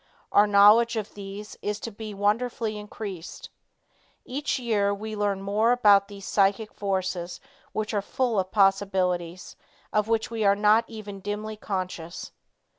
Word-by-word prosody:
Our 205 +1 +5
knowledge 210 +3 +6
of 215 -2 -4
these 200 +1 -8
is 210 0 -2
to 230 - -5
be 215 +1 -7
wonderfully 215 +2 0
increased. 205 -4 -8 0.7
Each 285 +4 -2
year 215 -5 +1
we 215 +1 -6
learn 200 -2 -1
more 210 +4 +2
about 205 -5 +5
these 200 -1 -10
psychic 200 +2 +1
forces 185 -3 -3 0.3
which 215 +1 -3
are 205 - +1
full 235 +1 0
of 185 0 -2
possibilities 190 -3 +1 0.4
of 215 0 +2
which 225 0 0
we 225 -1 -2
are 200 0 +5
not 210 +2 +4
even 210 -3 -8
dimly 210 +2 -4
conscious. 185 -5 -5
205 Hz, 145 wpm, -26 LUFS, 195-220 Hz, 0.7 s, knowledge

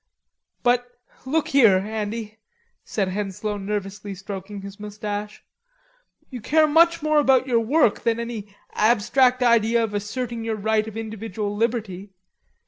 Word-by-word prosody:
"But, 245 0 +1 0.3
look 310 +3 0
here, 230 -9 +6
Andy," 215 +2 -4 0.4
said 195 -3 -2
Henslowe 205 +2 -3
nervously 200 0 -4
stroking 195 +1 -7
his 200 +1 -9
moustache. 210 0 -6 0.9
"You 250 -3 -7
care 310 +7 +4
much 335 +1 +4
more 305 -1 +3
about 265 -3 +4
your 245 -3 +2
work 240 +1 +2
than 230 -1 0
any 230 -3 -5 0.3
abstract 250 +4 +3
idea 235 -1 +3
of 215 -2 -3
asserting 230 +3 -4
your 225 -1 -2
right 215 +1 0
of 220 0 -7
individual 220 -1 -4
liberty. 210 -4 -2
220 Hz, 135 wpm, -23 LUFS, 205-245 Hz, 0.9 s, here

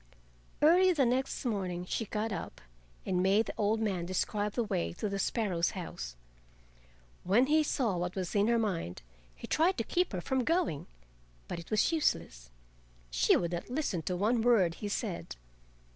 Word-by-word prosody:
Early 360 +4 +6
the 285 -5 +3
next 260 +3 -1
morning 185 -6 -2
she 225 - -2
got 215 +2 -2
up 195 - -5 0.5
and 180 -1 +1
made 200 +4 +3
the - - -5
old 215 +1 +1
man 190 -6 -1
describe 205 +3 -1
the 240 - 0
way 85 - -2
to 210 - -3
the 200 -1 -3
sparrow's 190 -7 0
house. 60 - -6 1.1
When 215 +8 +4
he 310 +3 +4
saw 240 -10 0
what 175 +1 -3
was 185 -2 -3
in 205 0 +3
her 235 0 +3
mind 175 - -2 0.3
he - - -9
tried 350 +4 +2
to - - 0
keep 360 0 0
her 185 - -1
from 265 +5 0
going, 330 - 0 0.6
but - - -4
it 170 - -11
was 215 +8 +2
useless. 80 - -1 0.6
She - - +4
would 170 -1 -2
not 175 +5 -4
listen 250 - -1
to 180 - 0
one 225 +5 +2
word 220 -8 +4
he 210 - -2
said. 200 -4 -3
205 Hz, 175 wpm, -31 LUFS, 175-245 Hz, 1.1 s, Early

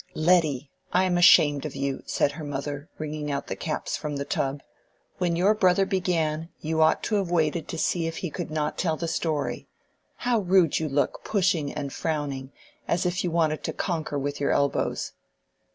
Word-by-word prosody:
"Letty, 155 -5 +2 0.2
I 180 - +3
am 185 -1 +1
ashamed 145 -5 +6
of 155 - -5
you," 140 -1 -2
said 140 - +1
her 155 +2 -8
mother, 145 +1 -4
wringing 155 -1 -4
out 140 -1 -2
the - - -4
caps - - -3
from 150 -1 -4
the 140 0 -3
tub. 140 0 -2 0.6
"When 175 -2 +1
your 190 +5 +4
brother 195 -2 +3
began, 165 -4 0
you 160 +1 -1
ought 160 0 +4
to 215 - +1
have 195 -3 -1
waited 160 -2 +1
to 165 - -5
see 165 +1 0
if 165 - -4
he 180 - -4
could 175 0 -5
not 155 -1 -2
tell 160 -4 +1
the 170 - -3
story. 155 -3 -2 0.5
How 245 -2 +1
rude 185 -4 +3
you 160 -1 -2
look, 140 +1 0
pushing 175 -8 +1
and 140 -2 -5
frowning, 145 -4 -3 0.4
as 175 +2 +1
if 180 +1 0
you 180 - 0
wanted 160 -2 +1
to - - -2
conquer 160 -5 -2
with 145 +1 -3
your 140 - +1
elbows! 140 0 0
160 Hz, 190 wpm, -26 LUFS, 145-175 Hz, 0.6 s, ashamed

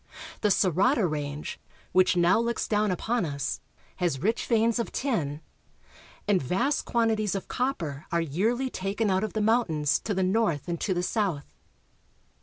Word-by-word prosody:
The 210 - +3
Sorata 200 - +3
range, 145 -1 -4 0.3
which 185 0 +4
now 175 +4 +4
looks 235 0 -1
down 210 0 +2
upon 220 +5 0
us, 140 -4 -3 0.4
has 175 -7 0
rich 220 - 0
veins 230 0 +2
of 235 - -2
tin, 160 - -1 0.9
and 200 -3 +3
vast 190 - 0
quantities 220 -4 +1
of 195 - -4
copper 170 - -2
are 170 - +2
yearly 220 - 0
taken 200 +2 -1
out 190 +1 +1
of 215 - -3
the 215 - -1
mountains 165 - +2
to 205 - -3
the 190 - +1
north 185 -6 +1
and 170 -1 -3
to 190 - 0
the 175 - 0
south. 180 -8 -1
195 Hz, 160 wpm, -27 LUFS, 165-225 Hz, 0.9 s, which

